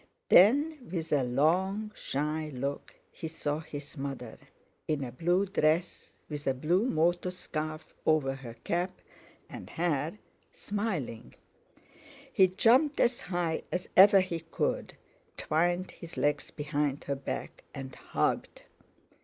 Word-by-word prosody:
Then, 275 - +5
with 165 -3 -3
a 145 - +4
long, 180 - +1
shy 150 +2 -2
look 140 +2 -4 0.2
he 160 - -6
saw 150 -2 -2
his 145 -1 -8
mother, 135 -4 -5 0.5
in 150 -3 0
a 125 - -5
blue 175 +9 +1
dress, 170 -2 0 0.2
with 150 -2 -6
a 135 - +2
blue 175 - +2
motor 175 -2 +1
scarf 155 -3 -5
over 150 -4 +2
her 125 -4 -9
cap 175 +2 -1 0.5
and - - -9
hair, 165 +1 -1 0.3
smiling. 195 - -4 1.0
He 190 - +6
jumped 245 - +3
as 240 0 +2
high 175 -3 -1
as 180 - -2
ever 195 +1 +9
he 175 -3 -3
could, 165 - -2 0.4
twined 175 +4 0
his 170 -1 -11
legs 145 -1 +1
behind 145 -1 -2
her 140 - -2
back, 135 - -5
and 135 -2 -7
hugged. - - -2
160 Hz, 130 wpm, -30 LUFS, 145-185 Hz, 1.0 s, ever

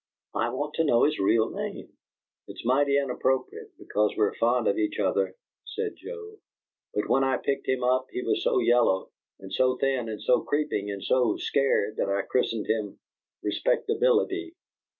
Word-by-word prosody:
I - - 0
want 150 +1 -3
to 165 - +3
know 120 -6 +3
his 150 - +2
real 110 +3 +2
name." - - -6 0.5
"It's - - -10
mighty 140 +3 +3
inappropriate, 130 -1 -2
because 105 0 0
we're 105 -2 +2
fond 120 0 +1
of 100 - +1
each 105 -1 -1
other," 95 -1 0 0.3
said 445 -1 -4
Joe, 435 -3 -9 0.6
"but - - 0
when 135 - +3
I 135 -1 +2
picked 140 - -2
him 130 -1 0
up 130 +1 +2
he 125 - -4
was - - 0
so - - +2
yellow, 120 -5 +2 0.3
and 95 0 -10
so 130 +2 +2
thin, 130 -4 0
and 110 - -5
so 125 - +2
creeping, 145 -8 -1
and 100 -1 -5
so 125 -4 +2
scared 135 -6 +1
that - - 0
I 100 0 0
christened 115 -2 -1
him 110 -3 -2 0.5
'Respectability.'" 435 -7 +1
125 Hz, 170 wpm, -27 LUFS, 105-145 Hz, 0.6 s, to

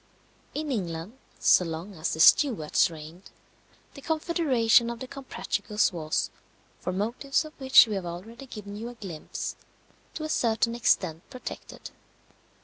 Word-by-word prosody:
In 300 -1 -2
England, 180 -2 -3 0.2
so - - +5
long 165 +4 -5
as 160 -2 -2
the - - -8
Stuarts 190 - +5
reigned, 165 +3 -11 0.6
the 275 - -11
confederation 280 -8 +2
of 235 -1 -5
the 260 - -6
Comprachicos 245 -6 -1
was 155 -2 -1 0.5
(for 180 - -3
motives 235 +10 -1
of 310 - -10
which 265 -1 +8
we 220 - -4
have 190 -3 -3
already 225 +10 -8
given 205 -4 -8
you 225 +3 -5
a 245 - -10
glimpse) 185 -9 -6 0.6
to 310 - -4
a - - -2
certain 230 -4 +1
extent 170 -8 +1
protected. 255 -2 -8
225 Hz, 145 wpm, -27 LUFS, 175-260 Hz, 0.6 s, which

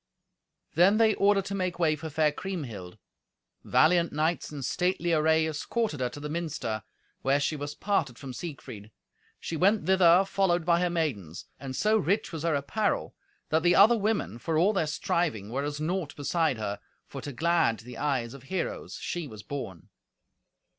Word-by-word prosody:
Then 185 +6 +5
they 220 -1 +4
ordered 200 -1 +3
to 200 - -4
make 185 -2 -2
way 160 -3 +2
for 160 +2 -7
fair 155 0 +2
Kriemhild. 125 - -6 0.7
Valiant 170 +1 +3
knights 155 +3 -1
in 145 -2 -6
stately 175 +3 0
array 160 0 +3
escorted 160 - -2
her 125 -1 0
to 145 - -9
the 150 - -5
minster, 150 -9 -3 0.4
where 135 +1 +2
she 150 +2 0
was 145 0 -5
parted 155 - -1
from 135 -3 -8
Siegfried. 125 -9 -8 0.5
She 165 - -5
went 200 +6 +3
thither 185 0 +5
followed 185 -4 +1
by 170 0 +3
her 180 0 +1
maidens; 120 - -3
and 135 -2 -6
so 215 +7 +3
rich 200 +3 0
was 160 - -4
her 165 -2 +1
apparel 145 +10 -1 0.4
that 160 +1 +2
the 175 +1 +4
other 220 +4 +7
women, 210 - -1
for 160 +5 -1
all 190 +7 +4
their 175 -6 0
striving, 150 - -1
were 135 +3 -1
as 145 0 -3
naught 165 0 -2
beside 155 -1 0
her, 105 -2 -4 0.3
for - - -8
to 145 - -6
glad 160 -5 +1
the 125 +2 -10
eyes 130 -5 -1
of 140 - -11
heroes 185 +5 -4
she 175 -3 -4
was 110 -6 -10
born. 105 - -7
160 Hz, 175 wpm, -28 LUFS, 140-180 Hz, 0.7 s, other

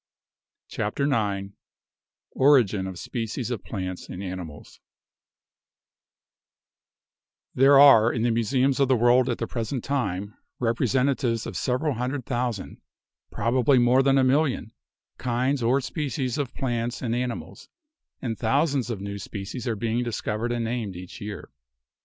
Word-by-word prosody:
CHAPTER 105 +7 -2
IX 100 -8 0 0.8
ORIGIN 120 -9 +3
OF 95 -2 -7
SPECIES 115 +4 -4
OF 115 -5 -4
PLANTS 95 -3 -5
AND 90 - -6
ANIMALS 90 -6 -8 2.7
There 135 +2 +6
are 120 -5 +8
in 115 - -2
the 120 - +2
museums 130 +4 +1
of 140 - +4
the 130 - +4
world 120 +2 +4
at 120 - -1
the 115 - -2
present 115 +2 -4
time 105 -7 -2 0.2
representatives 125 0 0
of - - -6
several 140 +4 0
hundred 125 +2 -3
thousand 120 -5 -3 0.2
— - - -56
prob 115 - -1
ably 130 +2 +4
more 125 +2 +5
than 135 0 +3
a 135 - +4
million 130 -4 +1 0.2
— - - -60
kinds 130 +2 0
or 120 +4 +3
species 135 -2 -3
of 135 -4 -3
plants 120 -1 -2
and 115 -2 -1
animals, 125 -1 -5 0.5
and 115 -3 -3
thousands 135 +1 +1
of 110 -5 -4
new 100 0 -5
species 105 +6 -6
are 115 - 0
being 115 +3 -1
discov 110 -2 -3
ered 120 +2 -2
and 120 -1 -1
named 115 -5 -3
each 90 0 -10
year. 105 0 -7
120 Hz, 145 wpm, -25 LUFS, 110-130 Hz, 2.7 s, are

